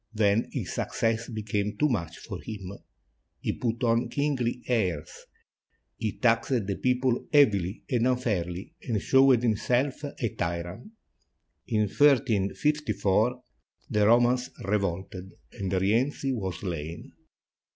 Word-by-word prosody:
Then 105 +1 +2
his - - -4
success 115 0 -1
be 110 -2 -5
came 105 0 -2
too 150 - +3
much 85 - -2
for - - -8
him. 100 -4 -7 0.7
He - - -2
put 115 0 -2
on 115 +1 +2
kingly 130 -4 -1
airs, 95 -11 -2 0.7
he 110 -2 -3
taxed 115 -1 +2
the 100 0 -2
people 125 -1 +1
heavily 105 - +3
and 120 -1 +1
unfairly, 105 - -1
and 115 -6 -1
showed 130 +1 +4
himself 125 +5 +1
a 135 -5 -3
tyrant. 85 - -5 0.7
In 110 -2 +1
1354, 120 -1 +2 0.5
the 105 -1 +3
Romans 120 +2 +4
revolted 95 -1 -2 0.2
and 95 -2 -4
Rienzi 115 +9 +1
was 95 -7 -4
slain. 85 -3 -5
115 Hz, 120 wpm, -27 LUFS, 95-125 Hz, 0.7 s, showed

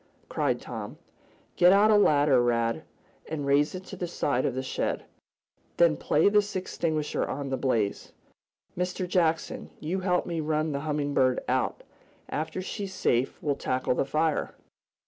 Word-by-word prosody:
cried - - 0
Tom. - - -7 0.6
"Get 180 0 +7
out 205 +3 +5
a - - +6
ladder, 145 -9 +4
Rad, 115 +4 0 0.4
and 150 -3 -3
raise 145 +4 +2
it 185 - -6
to 195 - -8
the 180 -1 -4
side 140 -6 0
of 125 - -2
the 130 - -2
shed. 130 - -2 0.7
Then 170 -2 +5
play 150 +4 +2
this 205 0 +2
extinguisher 160 -4 -1
on 140 0 -4
the 135 - 0
blaze. 115 -7 -1 0.6
Mr. 180 +1 -2
Jackson, 165 -3 0
you 170 +5 -2
help 180 -1 +1
me 170 -2 -3
run 155 0 0
the 140 - -2
Humming 145 -1 -1
Bird 130 -2 +2
out. - - -1 0.5
After 160 +4 -3
she's 195 -1 -5
safe 125 -7 +1
we'll 145 - +1
tackle 130 -1 -1
the - - +1
fire." 155 +3 -1
155 Hz, 160 wpm, -27 LUFS, 140-180 Hz, 0.7 s, Get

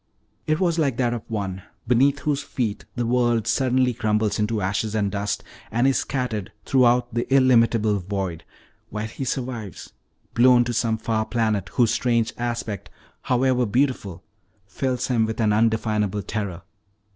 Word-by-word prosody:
It 155 +1 +1
was 170 -3 +1
like 140 -6 +1
that 120 -2 +1
of 120 - -3
one 95 -4 -3 0.3
beneath 135 +4 +3
whose 145 -1 0
feet 115 -7 -3
the 120 -2 -1
world 120 -2 +2
suddenly 130 -1 +2
crumbles 105 -1 0
into 105 +1 0
ashes 100 +3 -1
and 100 -2 0
dust, 100 0 -2 0.3
and 120 +3 +1
is 135 -1 +3
scattered 120 -6 -3
throughout 125 -2 +3
the 120 +2 -2
illimitable 115 -5 +4
void, 95 -3 -4 0.5
while 105 +1 -4
he 110 +5 -6
survives, 120 - -5 0.4
blown 120 0 +6
to 120 0 -3
some 115 -1 +1
far 110 -1 -1
planet 110 -5 0
whose 120 -3 +3
strange 115 -2 +1
aspect, 120 -3 -3 0.3
however 125 -1 +1
beautiful, 105 -7 -1 0.4
fills 125 +5 -2
him 115 -3 +1
with 110 - -4
an 110 -2 +3
undefinable 105 -2 +1
terror. 95 -5 -4
115 Hz, 150 wpm, -23 LUFS, 105-125 Hz, 0.5 s, blown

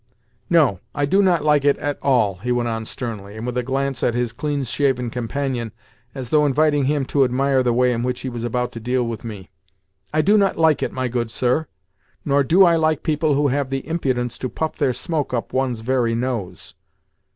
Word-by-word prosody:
"No, 145 - +3 0.2
I 145 -1 +1
do 190 +8 +3
not 180 -5 +2
like 150 -2 +4
it 145 0 +3
at 145 -1 -3
all," 110 -9 +2
he 120 +7 -3
went 120 -1 0
on 115 -1 -3
sternly, 110 -4 -6
and 110 - -5
with 125 0 -3
a 125 - +1
glance 135 +2 -2
at 120 - +1
his 120 -1 -1
clean 145 +2 -2
shaven 125 -1 0
companion, 125 -1 -3 0.4
as 130 -3 -6
though 150 -1 +4
inviting 145 0 +2
him 145 0 0
to 140 +1 +2
admire 130 +1 +2
the 125 -1 +1
way 125 +1 +2
in 115 - -2
which 125 0 -2
he - - -5
was 120 -2 -6
about 125 +1 -1
to 115 - -7
deal 125 +2 0
with 115 0 -5
me. 105 -5 -8 0.6
"I 155 +1 +2
do 205 +6 +4
not 195 -1 +1
like 160 -2 +3
it, - - -1
my 130 0 -2
good 120 -1 -2
sir, 125 +7 0 0.6
nor 140 0 +3
do 180 +8 +5
I 170 -1 +4
like 155 -2 +1
people 155 -2 +1
who 145 0 +2
have 140 0 -1
the 135 0 -4
impudence 130 -7 -2
to 130 - -3
puff 160 +4 -3
their 130 - +1
smoke 150 -2 -2
up 120 - -4
one's 130 -3 -1
very 120 -1 +1
nose." 105 -9 -4
130 Hz, 220 wpm, -21 LUFS, 120-145 Hz, 0.6 s, do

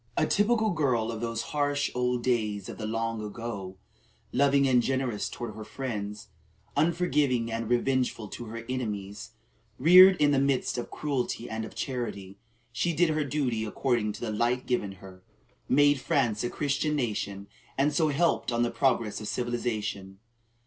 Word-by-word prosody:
A - - +3
typical 220 +1 +2
girl 125 -8 +1
of 115 - -6
those 115 -1 -2
harsh 145 -1 0
old 125 -1 0
days 105 -6 0
of - - -8
the 110 - -3
long 115 0 -2
ago, 105 -3 -6 0.6
loving 140 +1 +4
and 125 -2 +4
generous 130 -4 -1
toward 120 -3 -6
her 110 +1 -8
friends, 105 -4 -5 0.5
unforgiving 145 -7 +1
and 115 0 -3
revengeful 125 -2 0
to 120 - -7
her 115 +1 -7
enemies, 105 -3 -4 0.4
reared 185 +6 +8
in 145 -1 +4
the 140 - +3
midst 135 -2 +1
of 120 - -5
cruelty 135 -5 -2
and 110 0 -4
of 110 - -11
charity, 100 -7 -4 0.3
she 170 +8 0
did 170 +2 +3
her 155 0 0
duty 130 -6 -1
according 110 0 0
to - - -10
the 115 - -2
light 120 +4 0
given 105 -6 -1
her, 95 -1 -13 0.5
made 145 +1 +4
France 120 -8 +1
a 120 - -1
Christian 145 +2 -1
nation, 105 -6 -2 0.3
and 145 +2 +2
so 160 +1 +3
helped 155 -2 +1
on 120 0 +1
the 120 - 0
progress 115 -6 0
of 105 - -6
civilization. 110 -6 -3
120 Hz, 165 wpm, -28 LUFS, 110-140 Hz, 0.6 s, reared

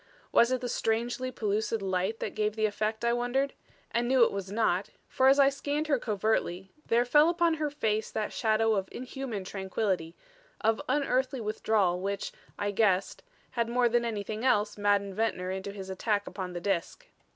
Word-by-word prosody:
Was 235 +2 +5
it 255 -1 0
the 250 - -2
strangely 240 +3 -1
pellucid 220 0 -1
light 190 +3 -1
that - - -3
gave 210 0 -1
the 220 -1 +1
effect, 215 +2 -1
I 235 - +3
wondered; 245 +3 0 0.4
and 235 +1 0
knew 255 -1 +5
it - - +3
was 195 -1 -5
not, 205 -3 +1 0.2
for 260 - +2
as 270 +1 +6
I 275 -1 +6
scanned 285 +2 -2
her 285 -4 +1
covertly, 200 -4 -1 0.2
there 235 +1 +3
fell 295 +6 +5
upon 340 -1 +2
her 305 -2 -1
face 220 -7 -1
that 215 - -3
shadow 220 0 +2
of 195 -2 -1
inhuman 250 -5 -5
tranquillity, 190 -3 -2 0.4
of 225 +4 +1
unearthly 265 -1 +1
withdrawal 210 -4 +1
which, 200 +1 -3 0.3
I 205 0 -1
guessed, 195 -2 +1 0.3
had 235 -2 -1
more 245 0 +3
than 240 0 +2
anything 215 -1 -3
else 215 -5 +2
maddened 205 -1 +1
Ventnor 185 -3 -1
into 190 +1 -4
his 195 -1 -8
attack 205 +2 0
upon 185 -2 -6
the 175 - -3
Disk. 190 -3 -2
220 Hz, 180 wpm, -29 LUFS, 200-245 Hz, 0.4 s, as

